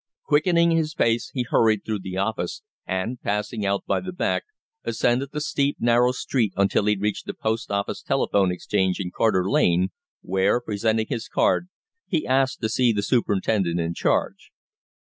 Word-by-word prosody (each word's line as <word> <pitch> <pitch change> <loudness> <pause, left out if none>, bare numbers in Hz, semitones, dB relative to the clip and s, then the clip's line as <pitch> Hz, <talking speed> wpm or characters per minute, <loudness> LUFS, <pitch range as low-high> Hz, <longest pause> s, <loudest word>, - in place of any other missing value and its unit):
Quickening 170 +3 +3
his 160 -2 0
pace, 115 0 +1
he 125 - 0
hurried 110 -2 +2
through 110 -2 -2
the 95 0 -6
office, 110 - -2 0.2
and, 100 +7 -3
passing 105 +1 -2
out 100 0 -1
by - - +1
the 185 - -6
back, 180 - -1 0.4
ascended 125 +3 0
the 150 - -3
steep, 140 -1 0
narrow 120 +1 +3
street 120 -5 -1
until 100 +1 +2
he 105 0 +3
reached 105 +1 -2
the - - -4
Post 110 +1 -2
Office 100 0 -2
Telephone 95 -3 +1
Exchange 95 +1 0
in 90 -2 -4
Carter 95 -5 +2
Lane, 90 -1 +2 0.3
where, 95 +5 +2
presenting 110 -1 0
his 115 -3 -4
card, 180 - +1 0.4
he 160 -4 -1
asked 130 0 +1
to 110 - 0
see 120 +1 +3
the 105 -2 -1
superintendent 100 -6 +1
in 85 0 -1
charge. - - -1
110 Hz, 165 wpm, -24 LUFS, 100-125 Hz, 0.4 s, Quickening